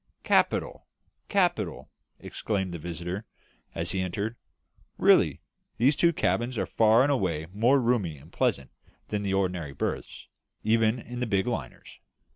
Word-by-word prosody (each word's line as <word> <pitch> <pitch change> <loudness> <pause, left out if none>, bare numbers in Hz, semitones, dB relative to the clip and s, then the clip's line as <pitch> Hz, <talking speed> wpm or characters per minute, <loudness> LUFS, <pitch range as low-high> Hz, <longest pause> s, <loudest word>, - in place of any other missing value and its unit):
"Capital, - - +1 0.4
capital!" 175 - 0 0.3
exclaimed 95 -4 -3
the 85 - -5
visitor, 85 +5 -5 0.5
as - - -1
he 95 - -1
entered. 100 +5 -3 0.6
"Really, - - +4 0.4
these 135 +5 +4
two 170 +4 +4
cabins 120 -6 0
are - - 0
far 110 +2 +4
and 145 - +2
away 85 - 0
more 120 +7 +4
roomy 115 - 0
and 75 +5 -17
pleasant 65 -1 0 0.4
than 105 -1 -1
the 100 -1 -1
ordinary 90 -7 -1
berths, 70 - -4 0.4
even 110 +1 +3
in 120 0 -8
the 125 - -1
big 100 -3 +1
liners. 115 - -6
105 Hz, 140 wpm, -27 LUFS, 90-120 Hz, 0.6 s, Really